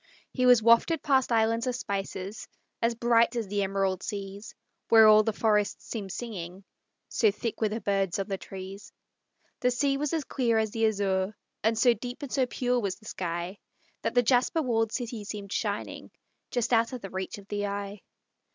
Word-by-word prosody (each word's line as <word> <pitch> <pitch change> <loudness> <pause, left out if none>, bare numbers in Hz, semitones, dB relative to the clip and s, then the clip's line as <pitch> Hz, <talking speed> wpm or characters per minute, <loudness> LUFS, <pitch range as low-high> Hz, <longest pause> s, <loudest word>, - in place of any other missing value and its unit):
He 255 -1 +2
was 245 -3 +6
wafted 235 +7 +4
past 265 -4 +2
islands 230 +1 +2
of 250 - 0
spices, 195 -2 -4 0.3
As 230 0 +1
bright 235 +1 +3
as 230 -3 -2
the 200 +1 -1
Emerald 195 -1 0
seas, 200 0 -6 0.3
Where 225 -1 +8
all 215 0 +8
the 220 - 0
forests 210 -1 +1
seem 205 -4 -5
singing, 190 -4 -6 0.4
So 220 - +3
thick 220 +3 -4
were 215 - +2
the 220 +2 -4
birds 195 -3 0
on 195 - -1
the 195 -2 -3
trees; 195 +1 -9 0.7
The 250 - +2
sea 275 +3 +1
was 295 0 -1
as 320 -2 0
clear 240 -5 0
as 220 -1 +1
the 225 0 +2
azure, 200 -1 0 0.3
And 220 +1 +2
so 240 +2 +5
deep 245 +5 -7
and 275 - -6
so 260 -2 +1
pure 245 0 0
was 200 -5 -2
the 215 - -21
sky 175 0 -4 0.4
That - - -2
the 245 - +5
jasper 250 +6 +2
walled 225 -3 +1
city 235 -3 -4
seemed 200 -1 -6
shining - - -3 0.4
Just 245 0 -1
out 230 +2 +3
of 250 - -5
the 195 - -8
reach 190 +1 -4
of 200 -1 -13
the 205 0 -2
eye. 200 0 -5
220 Hz, 190 wpm, -28 LUFS, 200-240 Hz, 0.7 s, Where